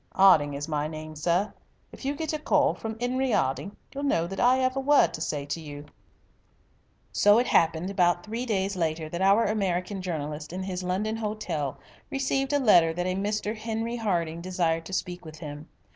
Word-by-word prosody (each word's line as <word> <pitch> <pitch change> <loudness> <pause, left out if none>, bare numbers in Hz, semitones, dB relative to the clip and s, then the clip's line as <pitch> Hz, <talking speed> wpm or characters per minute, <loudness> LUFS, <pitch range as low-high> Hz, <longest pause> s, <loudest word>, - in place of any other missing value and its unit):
'Arding 155 -7 +5
is 145 +1 -4
my 150 -1 -1
name, 155 0 -7
sir. 175 +6 0 0.4
If - - -11
you 280 +1 0
get 320 +1 -3
a 310 - -2
call 300 -1 +3
from 220 0 -6
'Enery 255 0 0
'Arding, 135 +10 -1 0.2
you'll 280 - -4
know 170 -12 +2
that 195 +2 -6
I 255 +1 +4
'ave 255 - +1
a 270 - 0
word 285 +1 +4
to 155 - -6
say 145 -3 -2
to 145 +3 -4
you." 145 -1 -8 1.3
So 205 +1 +5
it 245 - +3
happened 165 0 +2
about 175 -2 +2
three 225 +3 -4
days 195 -2 0
later 160 -2 -1
that 170 +3 -4
our 200 +4 +5
American 195 -2 -1
journalist 150 -4 -4
in 185 +1 -3
his 185 -1 -3
London 195 +5 -1
hotel 200 - -3 0.3
received 270 0 0
a 290 - +3
letter 175 -11 +5
that 175 +2 -2
a 185 - 0
Mr. 210 +2 -1
Henry 225 +2 -3
Harding 170 -7 -1
desired 170 -2 0
to 190 - -8
speak 180 -1 -3
with 155 -1 -10
him. 150 0 -8
185 Hz, 195 wpm, -27 LUFS, 160-220 Hz, 1.3 s, Arding